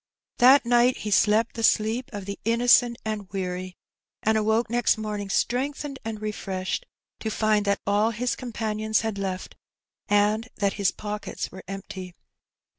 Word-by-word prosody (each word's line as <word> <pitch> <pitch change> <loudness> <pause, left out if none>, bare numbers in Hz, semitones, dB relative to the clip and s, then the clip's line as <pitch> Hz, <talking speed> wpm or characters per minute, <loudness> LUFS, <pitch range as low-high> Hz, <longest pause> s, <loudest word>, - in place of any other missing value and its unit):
That 260 +2 +7
night 240 +1 +4
he 210 - -5
slept 215 +3 +3
the 230 - -5
sleep 220 +3 +2
of 205 -3 -6
the 200 0 -6
innocent 235 +1 +4
and 210 -3 -4
weary^ 185 -1 -4 0.5
and 220 +1 +3
awoke 220 +2 +2
next 240 0 +2
morning 210 -2 -4
strengthened 275 +5 -1
and 220 -1 -5
refreshed, 210 - -3 0.3
to 220 - -3
find 215 -1 +1
that 200 0 +1
all 205 +2 +3
his 240 +2 -1
companions 220 -2 -1
had 220 -3 -3
left 190 -1 -4 0.5
and 210 +3 +2
that 200 -1 0
his 200 -2 +1
pockets 210 0 -5
were 190 - -10
empty 190 -2 -7
215 Hz, 150 wpm, -25 LUFS, 200-235 Hz, 0.5 s, That